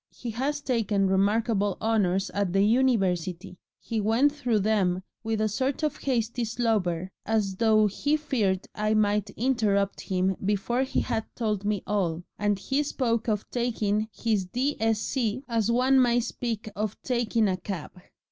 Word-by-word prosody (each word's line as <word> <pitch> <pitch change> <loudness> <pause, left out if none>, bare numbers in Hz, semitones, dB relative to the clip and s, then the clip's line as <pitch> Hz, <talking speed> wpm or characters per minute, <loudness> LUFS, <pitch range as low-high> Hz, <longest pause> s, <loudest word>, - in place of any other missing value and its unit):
He 240 - -7
has 280 +6 -2
taken 220 -7 +1
remarkable 205 +1 +1
honours 195 -4 +1
at 200 -3 -1
the 195 0 +4
University 195 -7 +1 0.2
he 225 -2 -3
went 230 +8 +3
through 250 -8 0
them 190 -3 +1 0.2
with 220 -1 -1
a 215 - +2
sort 260 +8 -1
of 300 -1 0
hasty 240 -2 -1
slobber, 210 -7 0
as 205 -4 0
though 215 -1 +4
he 285 +9 +1
feared 215 -11 -1
I 215 +1 0
might 210 -1 +2
interrupt 215 -5 +1
him 185 0 0
before 210 +5 0
he 265 - 0
had 225 -3 -2
told 210 -4 -1
me 205 -2 0
all 180 -5 -1 0.2
and 205 -1 +1
he 270 +8 0
spoke 240 -6 -1
of 210 -1 -1
taking 220 -3 0
his 215 -5 0
D.Sc. 230 +1 -1
as 230 -3 0
one 255 +3 +4
might 240 -1 +3
speak 230 -2 -4
of 210 0 -3
taking 235 -3 +1
a 185 -1 0
cab. 185 -3 -6
215 Hz, 155 wpm, -27 LUFS, 200-240 Hz, 0.2 s, the